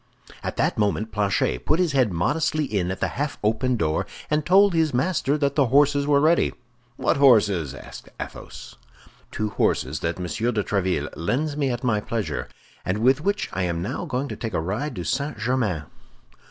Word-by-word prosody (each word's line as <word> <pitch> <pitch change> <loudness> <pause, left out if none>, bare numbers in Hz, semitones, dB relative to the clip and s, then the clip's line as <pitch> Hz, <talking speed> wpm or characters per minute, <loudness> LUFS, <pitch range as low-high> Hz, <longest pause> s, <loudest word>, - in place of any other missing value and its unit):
At - - -3
that - - +1
moment 105 +1 0
Planchet 100 - 0
put - - +3
his 180 -3 +1
head 130 -6 +2
modestly 150 - 0
in 100 -8 -1
at 95 - -4
the - - +2
half 145 +2 -3
open 115 +4 +1
door, 80 -5 0 0.2
and 150 0 +2
told 195 +3 +5
his 160 -5 +1
master 145 0 +1
that 140 -2 0
the 140 -3 +3
horses 140 +2 +3
were 145 -1 +4
ready. 160 +4 +3 0.4
"What - - +1
horses?" 105 - +4
asked - - -11
Athos. - - -9 0.5
"Two 105 0 -2
horses 70 -6 0
that 85 0 -2
Monsieur 110 +7 -1
de 105 -3 0
Tréville 90 -8 -1
lends 140 - -1
me 140 -2 0
at 120 0 -3
my 115 -4 +2
pleasure, 105 -7 -3 0.4
and 90 - -1
with 130 +6 +3
which 200 +4 0
I 95 - -2
am 85 -2 -1
now 125 +9 -3
going 130 +3 -2
to - - -4
take 115 -4 -5
a - - +1
ride 105 - -3
to 90 - -4
St. 140 - -2
Germain." 110 -8 0
120 Hz, 190 wpm, -24 LUFS, 95-145 Hz, 0.5 s, told